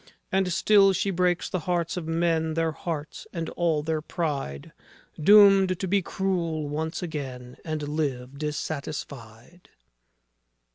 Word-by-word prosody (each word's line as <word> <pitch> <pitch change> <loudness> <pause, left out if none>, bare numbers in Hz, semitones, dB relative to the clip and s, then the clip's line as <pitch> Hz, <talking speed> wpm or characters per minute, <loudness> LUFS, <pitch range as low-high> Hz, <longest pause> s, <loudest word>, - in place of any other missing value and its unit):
And 190 -1 +1
still 195 +2 +5
she 195 +2 0
breaks 180 -1 +1
the 185 - -2
hearts 175 +1 0
of 175 -3 -5
men, 165 -1 0
Their 165 -1 +1
hearts 155 -1 -6
and 165 -3 -4
all 165 -4 0
their 160 0 -1
pride, 140 - -4 0.5
Doomed 195 -1 +6
to 190 - -2
be 200 +2 +2
cruel 170 -5 -2
once 160 +4 -3
again, 130 -6 -6
And 155 -2 -3
live 140 -3 -3
dissatisfied. 145 -2 -6
160 Hz, 130 wpm, -26 LUFS, 150-180 Hz, 0.5 s, Doomed